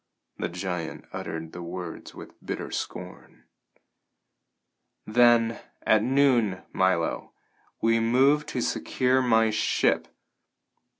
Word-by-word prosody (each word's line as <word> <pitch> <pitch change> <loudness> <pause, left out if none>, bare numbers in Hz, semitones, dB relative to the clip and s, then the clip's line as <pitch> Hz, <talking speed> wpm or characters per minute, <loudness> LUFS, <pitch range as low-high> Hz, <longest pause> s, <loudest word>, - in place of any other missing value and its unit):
The - - -2
giant 90 -2 -5
uttered 80 0 -5
the 90 - -8
words 85 0 -7
with - - -13
bitter - - -5
scorn. - - -7 1.6
"Then, 115 0 +4 0.2
at 110 -1 +4
noon, 120 -6 +2
Milo, 95 -3 0 0.5
we 115 0 +3
move 135 +6 +3
to 130 -4 -3
secure 130 +2 +1
my 115 -3 +3
ship!" 105 - +1
115 Hz, 100 wpm, -26 LUFS, 90-125 Hz, 1.6 s, Then